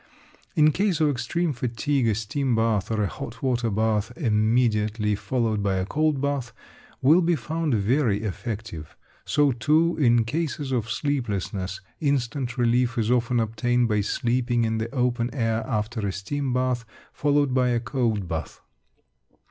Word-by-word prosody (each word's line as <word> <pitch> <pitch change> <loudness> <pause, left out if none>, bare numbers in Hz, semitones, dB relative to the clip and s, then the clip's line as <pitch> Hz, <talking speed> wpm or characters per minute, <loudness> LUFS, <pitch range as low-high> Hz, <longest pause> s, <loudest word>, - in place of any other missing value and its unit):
In 155 0 +5
case 190 0 0
of 155 -2 +3
extreme 150 +6 -1
fatigue, 125 +2 -1
a 110 - +2
steam 120 +4 -1
bath 110 -3 +1
or 110 -2 0
a - - +1
hot 140 +5 -8
water 120 -3 +1
bath 110 0 0
immediately 110 -4 +1
followed 110 0 -1
by 100 -1 0
a 95 0 0
cold 155 +4 +1
bath 140 -3 -2 0.5
will 155 +7 +6
be 170 0 +2
found 160 -3 -1
very 110 0 +1
effective. 105 - -5 0.3
So 145 -1 +3
too, 155 +8 +2
in 120 -4 +4
cases 145 +1 -2
of 115 -4 -1
sleeplessness, 105 -8 -2 0.2
instant 135 -3 -1
relief 120 0 +2
is 115 0 +1
often 120 0 +2
obtained 115 +2 +1
by 105 -1 +2
sleeping 120 +3 0
in 110 0 0
the 110 +1 -3
open 125 -2 0
air 115 -3 0
after 110 -1 -2
a - - -1
steam 130 +8 -3
bath 125 -1 0 0.3
followed 145 -2 +1
by 125 -1 +3
a 120 -1 +1
cold 110 -4 -1
bath. 80 -3 -5
120 Hz, 155 wpm, -25 LUFS, 110-140 Hz, 0.5 s, will